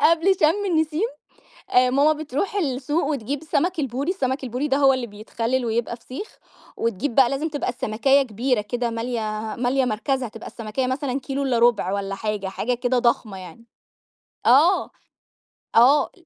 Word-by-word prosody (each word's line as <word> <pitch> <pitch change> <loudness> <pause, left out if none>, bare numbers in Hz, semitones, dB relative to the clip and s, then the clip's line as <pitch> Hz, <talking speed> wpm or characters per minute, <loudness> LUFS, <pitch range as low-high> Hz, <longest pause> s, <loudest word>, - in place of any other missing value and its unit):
قبل 335 +5 +4
شم 330 +7 +3
النسيم 320 +4 +1 0.6
آآ، 250 0 +4
ماما 285 +4 +4
بتروح 310 +6 -3
السوق 290 -1 -1
وتجيب 280 0 -3
سمك 340 +3 0
البوري، 275 +5 -2
السمك 265 -7 -2
البوري 255 +5 -2
ده 270 - +2
هو 275 -1 +5
اللي 255 -2 -2
بيتخلِّل 230 +4 -3
ويبقى 235 +1 -1
فسيخ، 260 - -9 0.4
وتجيب 230 +3 -2
بقى 260 -1 +5
لازم 290 +4 -1
تبقى 290 -3 -3
السمكاية 260 +5 +2
كبيرة 245 0 -1
كده 240 +3 -2
مالية، 230 +1 -3 0.4
مالية 255 +2 +1
مركزها 250 +3 -1
تبقى 225 +1 -11
السمكاية 230 +3 -3
مثلًا 260 +1 -2
كيلو 275 +2 -3
إلّا 255 -3 +1
رُبع 230 -5 +3
والَّا 195 -1 -2
حاجة، 210 -1 -3
حاجة 240 +5 -2
كده 245 +1 0
ضخمة 225 -4 0
يعني. 185 +5 -11 0.8
آه، 305 +10 +5 0.9
آه. 260 +6 +5
255 Hz, 155 wpm, -23 LUFS, 230-290 Hz, 0.9 s, هو